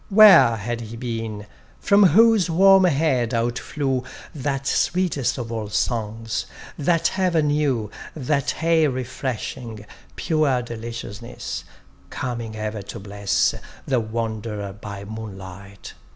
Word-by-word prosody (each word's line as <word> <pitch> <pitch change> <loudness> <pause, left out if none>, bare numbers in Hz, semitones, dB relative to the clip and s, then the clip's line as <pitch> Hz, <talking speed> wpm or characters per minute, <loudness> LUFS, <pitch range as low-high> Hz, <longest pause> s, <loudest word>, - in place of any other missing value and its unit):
Where 205 - +8
had 115 +2 -4
he 115 0 -8
been, 115 -3 -4 0.3
from 200 +1 +4
whose 210 +1 +5
warm 190 +3 +6
head 135 -7 +1
out 120 +1 0
flew 135 -4 -2 0.3
That 135 -1 -3
sweetest 175 -5 +1
of 120 -2 -5
all 110 -2 -4
songs, 110 0 -2 0.3
that 165 +5 +1
ever 175 -4 +2
new, 145 -8 0 0.2
That 145 +1 -1
aye 165 -1 +4
refreshing, 125 -4 -4 0.3
pure 150 -7 +1
deliciousness, 115 -1 -7 0.4
Coming 120 -4 -4
ever 110 -1 -4
to 100 +3 -8
bless 100 0 0 0.3
The 130 -3 +1
wanderer 110 -2 -4
by 100 -1 -8
moonlight? 100 -2 -9
120 Hz, 115 wpm, -23 LUFS, 110-150 Hz, 0.4 s, Where